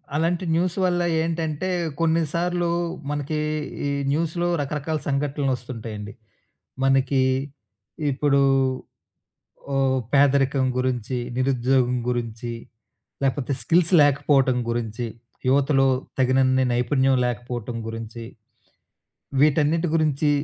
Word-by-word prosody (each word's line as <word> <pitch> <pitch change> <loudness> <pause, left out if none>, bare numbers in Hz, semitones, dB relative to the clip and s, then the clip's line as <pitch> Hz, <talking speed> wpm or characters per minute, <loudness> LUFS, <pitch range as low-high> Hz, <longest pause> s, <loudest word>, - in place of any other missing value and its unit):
అలాంటి 170 +3 0
న్యూస్ 175 +2 0
వల్ల 175 -1 +1 0.2
ఏంటంటే 165 +1 -2 0.3
కొన్నిసార్లు 170 +2 0 0.4
మనకీ 145 +1 -2 0.5
ఈ - - -1 0.2
న్యూస్‌లో 170 +3 0
రకరకాల 150 +2 -2
సంఘటనలొస్తుంటాయండి. 125 -7 -3 0.7
మనకీ 135 0 +3 0.9
ఇప్పుడూ 140 0 +2 1.3
ఓహ్! 135 -1 +2
పేదరికం 140 -1 +3
గురించి, 125 -1 -1 0.2
నిరుద్యోగం 130 -1 +2
గురించి 120 -1 -3 0.7
లేపోతే 135 0 0
స్కిల్స్ 170 +7 +2
లేకపోవటం 135 -2 +3
గురించి 115 0 -2 0.4
యువతలో 135 0 +3 0.3
తగినన్ని 130 0 +3
నైపుణ్యం 130 +2 +2
లేకపోవటం 120 -1 -4
గురించి 115 +1 -7 1.2
వీటన్నిటి 155 +3 +3
గురించి 150 -2 +2
135 Hz, 80 wpm, -23 LUFS, 125-155 Hz, 1.3 s, మనకీ